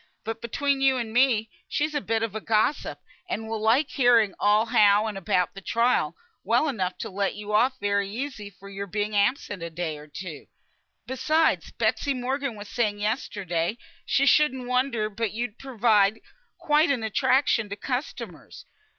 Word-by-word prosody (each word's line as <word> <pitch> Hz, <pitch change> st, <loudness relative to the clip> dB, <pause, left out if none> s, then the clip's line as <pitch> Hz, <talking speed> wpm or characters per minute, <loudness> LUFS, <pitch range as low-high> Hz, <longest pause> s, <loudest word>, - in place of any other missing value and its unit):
But 225 Hz, 0 st, -5 dB
between 275 Hz, +4 st, -1 dB
you 265 Hz, -1 st, +4 dB
and 230 Hz, -3 st, -4 dB
me, 240 Hz, -4 st, +3 dB, 0.2 s
she's 300 Hz, +1 st, -1 dB
a 290 Hz, -, -1 dB
bit 225 Hz, -2 st, -1 dB
of 225 Hz, -3 st, -2 dB
a 220 Hz, -, -4 dB
gossip, 220 Hz, +7 st, 0 dB, 0.3 s
and 220 Hz, -9 st, -3 dB
will 220 Hz, -1 st, -3 dB
like 245 Hz, +7 st, +3 dB
hearing 240 Hz, -6 st, +4 dB
all 210 Hz, +2 st, +4 dB
how 210 Hz, -3 st, +4 dB
and 215 Hz, -2 st, -3 dB
about 180 Hz, -1 st, 0 dB
the 195 Hz, -, -9 dB
trial, 235 Hz, +5 st, +1 dB, 0.3 s
well 315 Hz, -, +2 dB
enough 190 Hz, -9 st, -2 dB
to -, -, -4 dB
let 195 Hz, 0 st, -1 dB
you 210 Hz, 0 st, -6 dB
off 255 Hz, +4 st, +3 dB
very 200 Hz, -1 st, 0 dB
easy 225 Hz, -2 st, -5 dB
for 195 Hz, 0 st, -15 dB
your 200 Hz, 0 st, -6 dB
being 210 Hz, +2 st, -2 dB
absent 205 Hz, -2 st, 0 dB
a 170 Hz, -, -4 dB
day 160 Hz, -2 st, -4 dB
or 150 Hz, -, -12 dB
two. 155 Hz, 0 st, -8 dB, 0.6 s
Besides, 310 Hz, +5 st, +1 dB
Betsy 280 Hz, -1 st, 0 dB
Morgan 260 Hz, 0 st, -2 dB
was 205 Hz, 0 st, -9 dB
saying 210 Hz, -2 st, -1 dB
yesterday, 200 Hz, -4 st, -2 dB, 0.3 s
she 275 Hz, 0 st, +2 dB
shouldn't 270 Hz, -4 st, +3 dB
wonder 250 Hz, -3 st, +1 dB
but 215 Hz, 0 st, -3 dB
you'd 230 Hz, 0 st, -4 dB
prove 250 Hz, -4 st, -8 dB, 0.7 s
quite 300 Hz, +2 st, +3 dB
an 260 Hz, -5 st, 0 dB
attraction 225 Hz, 0 st, +2 dB
to 200 Hz, -, -4 dB
customers. 250 Hz, +6 st, -6 dB
225 Hz, 170 wpm, -26 LUFS, 205-260 Hz, 0.7 s, you